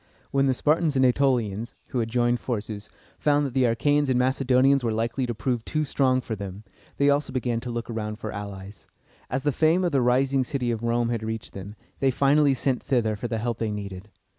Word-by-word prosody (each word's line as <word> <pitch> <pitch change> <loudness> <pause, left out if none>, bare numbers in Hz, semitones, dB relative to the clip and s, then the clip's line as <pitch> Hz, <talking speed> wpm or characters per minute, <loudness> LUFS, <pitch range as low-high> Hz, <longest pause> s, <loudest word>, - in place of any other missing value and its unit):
When 135 0 +2
the 130 - +2
Spartans 155 +2 +1
and 130 -1 +4
Ætolians, 120 -4 +1
who 125 - -1
had 115 -1 -1
joined 120 0 +1
forces, 105 -4 -4 0.3
found 145 -1 +2
that 135 - -4
the 130 -1 +3
Achæans 145 +5 +2
and 130 - +2
Macedonians 130 +1 +3
were 115 - 0
likely 115 +4 -1
to 120 - -3
prove 120 +1 -1
too 155 +4 -1
strong 130 -3 +1
for 115 - -4
them, 100 0 -7 0.3
they 140 - +3
also 145 +1 0
began 125 -2 -1
to 125 - -7
look 120 -1 -4
around 110 -2 -4
for 110 -1 -6
allies. 100 -2 -8 0.4
As 130 +2 -2
the 145 - +2
fame 160 +6 +3
of 175 - +1
the 135 -3 +2
rising 130 +2 +2
city 125 -2 -2
of 115 -2 -3
Rome 120 0 +1
had 115 -2 -1
reached 110 0 -5
them, 100 +2 -8 0.2
they 135 - +3
finally 140 +2 +3
sent 130 0 0
thither 110 -5 0
for 115 +4 -4
the 115 - -2
help 115 +1 -2
they 110 - -1
needed. 100 -1 -6
120 Hz, 215 wpm, -25 LUFS, 110-135 Hz, 0.4 s, and